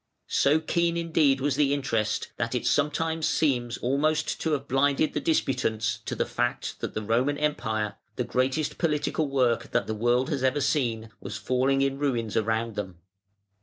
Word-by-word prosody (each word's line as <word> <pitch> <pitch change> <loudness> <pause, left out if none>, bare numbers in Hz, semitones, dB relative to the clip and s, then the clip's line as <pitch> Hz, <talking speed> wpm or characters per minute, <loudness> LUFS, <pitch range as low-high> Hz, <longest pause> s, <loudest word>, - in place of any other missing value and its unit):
So 145 +3 +3
keen 170 +1 0
indeed 160 -5 +2
was 140 0 0
the 145 -1 +3
interest 115 -6 -1
that 120 0 -2
it 125 - -2
sometimes 160 +2 +1
seems 125 -6 +1
almost 150 +5 0
to 160 - 0
have 140 -1 -2
blinded 140 +3 +2
the - - 0
disputants 115 -7 0
to - - -3
the - - 0
fact - - -2
that - - -5
the 110 - -2
Roman 125 +7 +1
Empire, 110 -9 -1 0.2
the - - -1
greatest 130 +4 -1
political 150 -2 0
work 125 -4 +1
that - - 0
the 110 - -3
world 120 +5 +1
has 140 -3 -1
ever 130 +2 +2
seen, 115 -7 0
was - - -6
falling 135 +2 +1
in 135 0 -1
ruins 120 -7 -1
around 110 +1 0
them. 95 -4 -5
135 Hz, 170 wpm, -27 LUFS, 115-150 Hz, 0.2 s, So